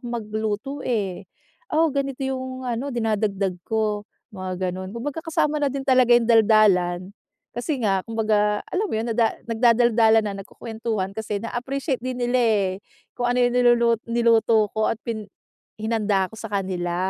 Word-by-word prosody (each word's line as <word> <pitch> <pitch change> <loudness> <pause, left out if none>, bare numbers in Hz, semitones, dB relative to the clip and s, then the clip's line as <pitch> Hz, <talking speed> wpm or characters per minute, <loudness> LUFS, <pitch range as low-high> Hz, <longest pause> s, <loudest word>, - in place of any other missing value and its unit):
magluto 215 +1 -3
eh. 200 -7 -2 0.5
Oh 315 -1 +2
ganito 275 -1 -2
yung 260 -1 -4
ano 245 +4 -2
dinadagdag 210 -4 0
ko." 215 -2 -1 0.3
Mga 185 -1 -3
ganun. 185 +1 -6
Kumbaga 290 +7 -5
kasama 305 -2 0
na 280 - +2
din 275 - -3
talaga 255 -2 +4
yung 235 - +1
daldalan, 210 -6 +4 0.5
kasi 260 +4 -2
nga 195 -2 +1
kumbaga 215 -2 0
alam 405 +4 -1
mo - - -2
yun, 225 - -2
nada 225 -1 +2
nagdadaldalan 230 -1 +4
na, 205 - -2
nagkukuwentuhan 220 -2 -4
kasi 215 -1 -3
na 230 - -6
appreciate 265 +1 -2
din 255 -1 -4
nila 245 +1 +1
eh, 210 -5 +2 0.4
kung 245 0 -1
ano 250 - +1
yung 245 - -1
nilulu 240 -1 +4 0.2
niluto 230 -2 +3
ko 220 0 +1
at 225 - -3
pin 220 -3 -4 0.5
hinanda 215 -3 0
ko - - -11
sa 220 -1 -7
kanila. 185 -3 -2
225 Hz, 160 wpm, -23 LUFS, 210-245 Hz, 0.5 s, talaga